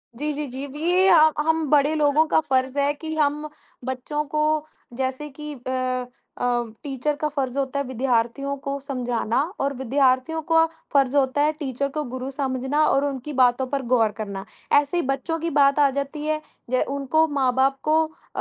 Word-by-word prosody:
जी, 300 +5 -2
जी, 295 +1 -3
जी, 260 +2 -6
जी। 285 +2 -9
ये 365 +2 +4
अ, 315 -2 +7
हम 320 0 +1
बड़े 290 +1 +4
लोगों 300 +1 +3
का - - +3
फर्ज़ 265 -2 0
है 285 +1 +2
कि 315 +2 -6
हम 300 0 0 0.4
बच्चों 260 +4 -3
को 305 0 +1 0.3
जैसे 260 +4 -3
कि 300 0 -5
अ 255 -1 -1 0.3
अ, - - -4 0.4
टीचर 285 +1 -2
का 300 +1 -1
फर्ज़ 270 -3 -3
होता 275 0 -1
है 280 - -2
विद्यार्थियों 255 +2 0
को 280 0 -3
समझाना 250 -3 -1 0.2
और 280 +1 0
विद्यार्थियों 265 +4 +1
का 325 0 +6 0.3
फर्ज़ 275 -1 +3
होता 270 +1 +2
है 300 +1 +3
टीचर 275 -1 -2
को 300 +2 -3
गुरु 260 +1 -4
समझना 265 +1 0
और 275 +1 +2
उनकी 280 +1 -4
बातों 255 0 +3
पर 275 +1 -2
गौर 225 -3 +4
करना। 200 -3 -5 0.3
ऐसे 290 +4 +3
ही - - +2
बच्चों 275 +5 -1
की 335 +1 -2
बात 280 -1 +4
आ 285 -1 +5
जाती 285 +2 -3
है 310 0 0 0.3
ज 255 - +3
उनको 280 +3 +2
माँ-बाप 270 -1 +1
को 305 - +2
अ 315 - -12
280 Hz, 185 wpm, -23 LUFS, 260-300 Hz, 0.4 s, अ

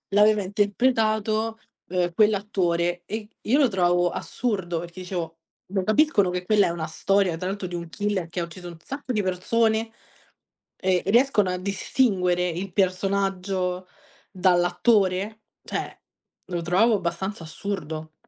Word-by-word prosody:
l'aveva 210 0 +5
interpretato, 215 +1 +1 0.3
uhm, 175 -1 0
quell'attore, 180 -4 +1
e 215 +2 -5
io 265 +7 +2
lo 280 - +5
trovavo 175 -4 +2
assurdo 190 -6 -2
perché 175 +2 -8
dicevo: 170 -3 -5 0.4
"Lo 190 -2 +1
capiscono 215 -4 +3
che 180 0 -3
quella 210 0 +4
è - - 0
una 165 -2 -4
storia, 190 +1 +1
tra 180 - -5
l'altro 195 -1 -3
di 175 - -6
un 170 -1 -5
killer 205 0 -1
che 175 - -4
ha 170 - -1
ucciso 175 +1 -10
un 170 -1 -11
sacco 275 -2 -5
di 215 - +1
persone, 220 +4 +1 0.9
ehm, 185 -1 +1
e 195 - +1
riescono 235 -6 +4
a 180 - -2
distinguere 185 -2 +1
il 180 +3 -5
personaggio 190 -1 0 0.4
dall'attore?" 190 +3 +2 0.2
Cioè, - - -5 0.5
lo 175 -2 -3
trovavo 200 +7 +4
abbastanza 180 0 -3
assurdo. 160 -2 -5
190 Hz, 140 wpm, -25 LUFS, 175-210 Hz, 0.9 s, l'aveva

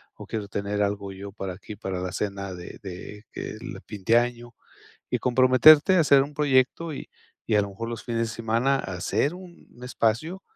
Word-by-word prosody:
o - - -10
quiero 105 -2 -4
tener 100 +1 -1
algo 100 -1 -2
yo 100 +1 -8
para 95 -2 -5
aquí 100 +3 -10
para 95 -3 -4
la 90 0 -3
cena 100 -1 -3
de 90 -1 -9
de 100 +2 -9
que - - -6
el 115 +4 -8
fin 105 -3 -9
de 115 +4 +5
año. 120 -1 -2 0.5
Y - - 0
comprometerte 130 +7 +6
a - - +5
hacer 140 -3 +5
un 145 +2 -9
proyecto 145 +3 +1
y - - -8 0.4
y 110 - +1
a 105 - +5
lo 100 - -4
mejor 115 +4 -6
los 115 - -6
fines 115 -1 -2
de - - -6
semana 115 +4 +1
a 95 - -5
hacer 100 - 0
un 180 -1 -13 0.2
espacio. 125 - -1
115 Hz, 205 wpm, -26 LUFS, 100-130 Hz, 0.5 s, comprometerte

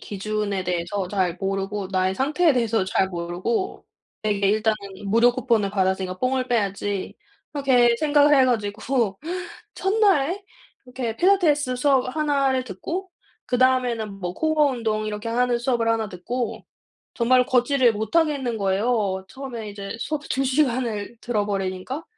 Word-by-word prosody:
기준에 205 -1 -3
대해서 180 +2 -2
잘 185 -3 0
모르고 195 0 -2
나의 185 0 +1
상태에 300 - +2
대해서 230 -5 +1
잘 190 0 +1
모르고 180 - -3 0.4
되게 205 -2 +1
일단은 215 +1 +2 0.3
'무료 230 +4 +4
쿠폰을 235 -5 +1
받았으니까 190 -1 -1
뽕을 255 +2 0
빼야지.' 200 -3 -1 0.4
그렇게 250 -5 +3
생각을 295 -1 +4
해 265 - +6
가지고 220 -2 0 0.6
1 385 - -1
날에 390 -4 +2 0.4
이렇게 250 -3 -4
필라테스 305 -8 +3
수업 260 -1 +2
1 285 -3 +1
를 260 -1 0
듣고 335 - -5 0.4
그다음에는 245 -5 +1
뭐 180 -1 -4
코어 315 +2 +2
운동 220 -3 -2
이렇게 210 +1 -4
하는 245 +1 +1
수업을 235 -2 0
1 225 -1 +1
듣고 235 +7 -4 0.5
정말 250 +1 +3
걷지를 255 -1 +3
못 220 +8 -4
하겠는 280 -8 +1
거예요. 195 -1 0
처음에 245 -5 -7
이제 200 +1 -7
수업 290 +2 -3
2 270 +1 +1
시간을 250 -6 0
들어버리니까. 205 - -2
235 Hz, 310 characters per minute, -23 LUFS, 200-265 Hz, 0.6 s, 해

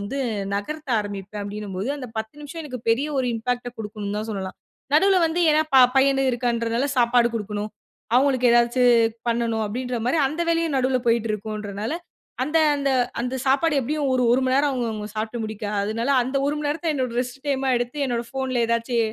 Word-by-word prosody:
வந்து 215 +8 -4 0.4
நகர்த்த 300 +9 -4
ஆரம்பிப்பேன். 205 0 -6
அப்பிடின்னம்போது, 205 +1 -4
அந்த 255 -3 -7
10 220 +2 -5
நிமிஷம் 295 +3 -7
எனக்கு 255 -5 -6
பெரிய 260 +6 +2
ஒரு 255 - +1
இம்பேக்ட்ட 245 +2 -2
குடுக்குன்னு 210 -1 -4
தான் 215 - -4
சொல்லலாம். 190 -2 -5 0.4
நடுவுல 385 +5 +5
வந்து 325 +2 -1
ஏன்னா 305 +1 +4
ப - - +9 0.2
பையனு 270 0 +4
இருக்கான்றதுனாலா 235 +1 0
சாப்பாடு 235 0 +4
கொடுக்கணும். 210 -1 -3 0.4
அவுங்களுக்கு 255 -1 +4
ஏதாச்சு 240 +1 +3 0.5
பண்ணணும் 230 -1 0
அப்பிடின்றமாரி 245 +5 -1
அந்த 310 +5 -2
வேலையும் 330 -3 +1
நடுவுல 260 0 +2
போயிட்டு 230 -1 +2
இருக்குன்றனால, 210 +1 -4 0.5
அந்த 300 +4 +1 0.2
அந்த 280 -1 0 0.3
அந்த 250 +1 -3
சாப்பாடு 280 +3 +3
எப்பிடியும் 285 +2 -1
ஒரு 255 - +2
ஒரு 260 +2 +3
மணி 260 +1 +2
நேரம் 285 +1 +3
அவுங்க 245 -3 -1
அவுங்க 210 -1 -5
சாப்புட்டு 220 +2 -3
முடிக்க, 215 -1 -5 0.2
அதனால 230 +5 -1
அந்த 260 +3 -3
1:00 290 - 0
மணி 295 -1 -2
நேரத்த 320 +2 -1
என்னோட 255 -4 -1
ரெஸ்ட் 250 +1 -5
டைம்மா 270 -1 +1
எடுத்து 245 +4 -2
என்னோட 240 -1 -2
ஃபோன்ல 260 -3 -1
ஏதாச்சு 235 +1 0
245 Hz, 175 wpm, -23 LUFS, 220-275 Hz, 0.5 s, ப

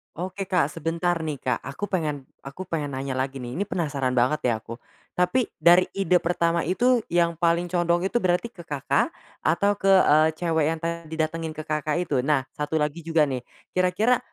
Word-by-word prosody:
Oke, 185 +2 -4
Kak, 180 -6 +1
sebentar 165 +3 -1
nih, 150 -4 -3
Kak, 125 -3 -2
aku 175 +9 -5
pengen 150 -7 -2 0.2
aku 170 +7 -8
pengen 150 -4 -3
nanya 135 0 -3
lagi 135 +1 -2
nih, 120 0 -6
ini 195 - 0
penasaran 145 -9 -1
banget 125 +4 +1
ya 110 - -1
aku. 115 +1 -8 0.4
Tapi 180 +7 +2
dari 175 +2 +5
ide 185 -2 +3
pertama 170 -1 0
itu 245 +6 +3
yang 170 -1 +1
paling 170 0 +1
condong 175 0 +1
itu 240 +5 +1
berarti 185 +4 0
ke 190 - -22
Kakak 145 -3 +1 0.3
atau 200 +5 +2
ke, 195 - -1
eee, 160 -5 +6
cewek 160 -3 +1
yang - - -10
tadi 165 -1 -4
datengin 160 0 -2
ke 155 - -5
Kakak 155 0 -1
itu? 145 -6 0
Nah, 135 0 +1
1 150 +1 -3
lagi 150 +1 0
juga 165 -1 +2
nih, 130 -3 -1 0.3
kira-kira, 185 +7 +2
165 Hz, 190 wpm, -25 LUFS, 150-180 Hz, 0.4 s, eee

